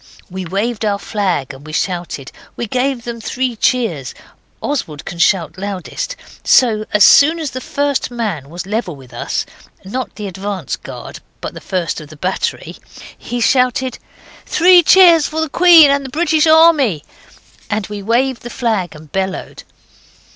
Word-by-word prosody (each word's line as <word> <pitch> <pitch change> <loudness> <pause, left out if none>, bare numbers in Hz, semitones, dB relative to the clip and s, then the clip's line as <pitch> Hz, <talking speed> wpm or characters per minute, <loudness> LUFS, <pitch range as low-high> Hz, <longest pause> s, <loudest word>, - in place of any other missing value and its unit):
We 185 0 -5
waved 210 +6 -2
our 205 -2 +1
flag, 185 - -2
and 135 +1 -13
we 155 +1 -10
shouted. 175 -7 -3 0.2
We 235 - -3
gave 255 +2 -1
them 235 -1 -6
three 255 +1 -2
cheers. 210 - -1 0.4
Oswald 160 - -4
can 170 - -7
shout 170 -1 +1
loudest. 200 - -5 0.3
So 220 -4 +3
as 210 -1 +4
soon 315 +8 +6
as 310 -4 -3
the 255 - -6
first 285 0 -1
man 210 - -4
was 175 +2 -7
level 200 -4 -3
with 130 -3 -15
us - - -3 0.4
(not 250 +6 -5
the 210 - -6
advance 190 -4 -4
guard, - - -10 0.2
but - - -6
the - - -10
first 175 -3 -3
of 150 - -12
the 155 - -12
battery) 185 +5 -3 0.4
he 245 - -5
shouted 255 +1 +1 0.5
'Three 360 +1 +6
cheers 345 -2 +6
for 315 - -4
the 320 -1 -1
Queen 335 -2 +7
and 280 0 +1
the 265 - -7
British 315 +2 +2
Army!' 310 - +4 0.7
And 215 -1 -1
then - - -13
we 205 -1 -5
waved 240 +4 0
the 240 - -8
flag, 220 -9 -2
and 150 0 -14
bellowed. 190 0 -4
220 Hz, 165 wpm, -16 LUFS, 185-270 Hz, 0.7 s, Queen